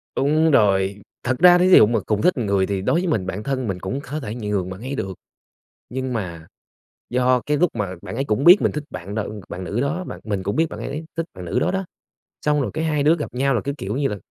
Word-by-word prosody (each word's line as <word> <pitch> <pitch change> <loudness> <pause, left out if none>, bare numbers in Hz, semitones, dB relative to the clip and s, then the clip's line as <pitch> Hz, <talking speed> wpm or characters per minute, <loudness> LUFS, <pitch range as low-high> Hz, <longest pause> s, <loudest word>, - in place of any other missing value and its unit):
Đúng 155 +3 +3
rồi, 100 -4 +3 0.2
thật 125 0 0
ra 180 0 +8
thí 180 +1 +3
dụ 180 - +9
mà 115 +1 +1
cùng 105 -1 0
thích 180 -6 +3
người 100 -4 +1
thì 100 -1 -2
đối 165 - +2
với 185 - -2
mình, 110 - 0
bạn 95 +3 -4
thân 130 -2 -2
mình 95 -3 -3
cũng 125 +10 -3
có 150 +2 -5
thể 110 -6 -5
nhường 105 -5 -2
bạn 95 +2 -8
ấy 130 +3 -4
được. 95 -6 -3 0.8
Nhưng 130 0 -3
mà 85 -8 -5 0.6
do 125 0 +2
cái 150 0 +1
lúc 175 +3 +3
mà 100 -4 -3
bạn - - -7
ấy 135 - 0
cũng 110 +2 0
biết 180 +5 +8
mình - - +2
thích 150 - -4
bạn 90 +3 -7
nữ 105 -1 -4
bạn 90 - -6
nữ 100 +7 -2
đó 160 +7 -1
mà - - -6
mình 100 -3 -3
cũng 100 +2 -2
biết 160 - +3
bạn - - -8
ấy - - -5
ấy 150 +3 -5
thích 165 - -1
bạn 90 - -8
nữ 105 +9 0
đó 180 - +1
đó, 190 0 -2 0.6
xong 150 -1 +2
rồi 135 - -1
cái 160 - -1
hai 150 -2 +1
đứa 155 +3 +4
gặp 150 - -5
nhau 135 +1 +1
là 120 - +1
cái, 140 0 -3
kiểu 100 +5 -3
như 140 0 +1
là, 105 - -3
125 Hz, 275 wpm, -22 LUFS, 100-150 Hz, 0.8 s, dụ